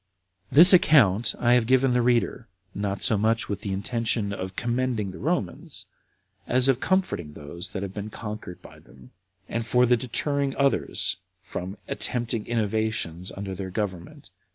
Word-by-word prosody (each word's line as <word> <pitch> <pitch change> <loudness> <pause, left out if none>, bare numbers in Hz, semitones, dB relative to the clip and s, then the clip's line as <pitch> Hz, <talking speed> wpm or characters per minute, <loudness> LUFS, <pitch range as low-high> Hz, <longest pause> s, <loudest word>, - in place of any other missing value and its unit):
8. - - -8
This 175 +6 +11
account 120 - +4
I 120 0 +3
have 120 -2 +3
given 130 0 +3
the 125 - +2
reader, 120 0 0 0.3
not 100 -1 -3
so 105 - +2
much 115 +2 +1
with 100 - -4
the 100 - -4
intention 105 +1 -2
of 95 -1 -6
commending 120 -4 -1
the - - -11
Romans, 145 - -3 0.6
as 130 +1 +3
of 130 -2 +3
comforting 180 - -1
those 75 +5 -7
that 95 - -4
have 95 -1 -6
been 105 +1 -6
conquered 105 -4 -8
by - - -14
them, 65 +1 -18 0.4
and 115 +1 -3
for 125 +2 +3
the 125 0 +4
deterring 135 +3 -1
others 140 -1 +1 0.3
from 95 +3 -6
attempting 115 -3 -2
innovations 110 -6 -2
under 95 -1 -5
their 95 0 -6
government. 95 -3 -6
110 Hz, 160 wpm, -25 LUFS, 95-125 Hz, 0.6 s, This